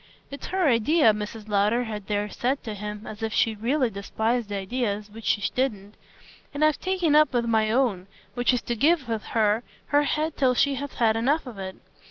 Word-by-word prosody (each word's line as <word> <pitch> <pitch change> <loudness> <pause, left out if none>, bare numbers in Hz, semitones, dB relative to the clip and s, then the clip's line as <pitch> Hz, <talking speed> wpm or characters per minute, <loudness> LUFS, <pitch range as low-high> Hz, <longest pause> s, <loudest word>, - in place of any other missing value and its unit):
"It's 280 - -7
her 375 -3 +1
idea," 240 +1 +4
Mrs. 210 +1 -6
Lowder 210 +4 +2
had 210 -4 -6
there 205 0 -1
said 255 +6 -2
to 220 - -5
him 210 +1 -6
as 215 0 -9
if 220 0 -2
she 225 0 +2
really 245 +4 0
despised 220 +3 -2
ideas 205 +1 -2
which 225 +1 -11
she 205 - +1
didn't; 210 -6 -2 0.6
"and 300 +2 +3
I've 310 -1 +2
taken 365 -5 +1
up 305 -2 +5
with 235 -1 +1
my 220 -2 +2
own, 220 -6 +1 0.3
which 245 +1 +2
is 250 -2 -1
to 240 - -2
give 310 +6 +3
her 220 -2 0 0.3
her 290 0 +4
head 310 +2 -1
till 255 -2 +3
she 280 +3 +3
has 280 0 -5
had 225 -2 +2
enough 280 +8 +1
of 235 -6 -9
it. 190 -1 -6
230 Hz, 200 wpm, -25 LUFS, 210-275 Hz, 0.6 s, up